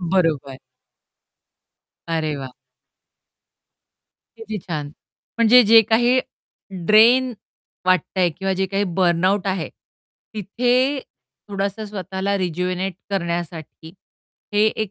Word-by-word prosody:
बरोबर. 165 -7 0 1.5
अरे 160 -2 -1
वाह! 130 -2 -8 1.8
किती 220 -1 -6
छान. 155 -5 -5 0.5
म्हणजे 235 +2 +7
जे 225 +2 +8
काही 240 +4 +3 0.7
ड्रेन 240 +4 +5 0.5
वाटतं 185 +1 +1
आहे 175 - +3
किंवा 195 +4 -3
जे 190 - +1
काही 200 +2 -1
बर्नआउट 185 +3 +2
आहे. 190 -4 -2 0.7
तिथे, 250 +7 +1 0.5
थोडसं 200 +2 -3
स्वतःला 195 0 -3
रिजुवेनेट 180 +1 -2 0.2
करण्यासाठी 170 -3 -4 0.6
हे 205 +1 +3
एक 215 -2 -2
190 Hz, 95 wpm, -21 LUFS, 170-215 Hz, 1.8 s, जे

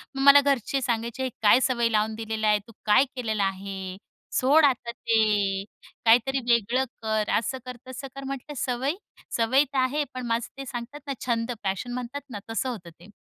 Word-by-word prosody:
मग 270 - -2
मला 280 0 +9
घरचे 275 -1 0
सांगायचे 235 +1 -2
"हे 260 - 0
काय 215 +3 +6
सवय 235 -2 +1
लावून 215 0 +1
दिलेला 220 -1 -2
आहे 210 0 +4
तू - - -13
काय 215 +6 +5
केलेलं 220 -5 -1
आहे? 190 -1 -4 0.4
सोड 290 +4 +5
आता 245 -3 +1
ते. 210 -4 +1 0.4
काहीतरी 245 +4 +4
वेगळं 235 +3 +2 0.2
कर." 220 -1 0
असं 235 +4 -2
कर 250 -1 -7
तसं 260 +2 -7
कर. 275 - -7
म्हटलं 275 +2 -6
सवय-सवय 260 - 0
तर 270 - -1
आहे 270 +4 +1
पण 255 -1 -5
माझं 230 0 0
ते 275 - -6
सांगतात 250 +3 -7
ना 275 - -1
छंद 235 -1 0
पॅशन 195 +6 -2
म्हणतात 250 +3 -5
ना 215 -5 -6
तसं 240 +3 -1
होतं 200 -9 -6
ते. 180 +4 -15
235 Hz, 180 wpm, -26 LUFS, 220-265 Hz, 0.4 s, मला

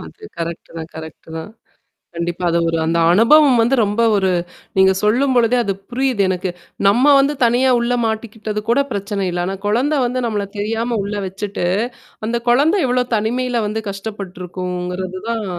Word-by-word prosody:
அது 435 - -13 0.2
கரெக்ட்தான், 165 -1 -6
கரெக்ட்தான். 160 +2 -8 0.7
கண்டிப்பா. 170 +1 -3
அது 170 - +2
ஒரு 165 - 0
அந்த 165 +1 +1
அனுபவம் 255 +5 +6
வந்து 255 +4 +2
ரொம்ப 205 +3 -1 0.2
ஒரு 190 -1 +2 0.5
நீங்க 190 0 +5
சொல்லும்பொழுதே 245 +1 +3
அது 195 - 0 0.2
புரியுது, 250 -4 0
எனக்கு. 185 0 -1 0.4
நம்ம 240 +7 +3
வந்து 280 +2 +2
தனியா 245 +3 +3
உள்ள 245 +1 0
மாட்டிக்கிட்டது 220 -1 -3
கூட 265 +4 +4
பிரச்சனை 200 -1 -2
இல்ல. 175 0 -2
ஆனா 195 +1 -3
குழந்த 255 +9 +1
வந்து 255 +1 -2
நம்மள 205 -3 -2
தெரியாம 225 +2 -1
உள்ள 205 +1 -4
வச்சுட்டு, 195 -1 -4 0.6
அந்த 235 +1 -1
குழந்த 295 +10 +4
எவ்ளோ 250 0 +2
தனிமையில 240 +2 0
வந்து 220 +1 -3
கஷ்டப்பட்டுருக்குங்கிறது 185 -2 -5
தான். 225 -3 -2
210 Hz, 145 wpm, -19 LUFS, 185-240 Hz, 0.7 s, அனுபவம்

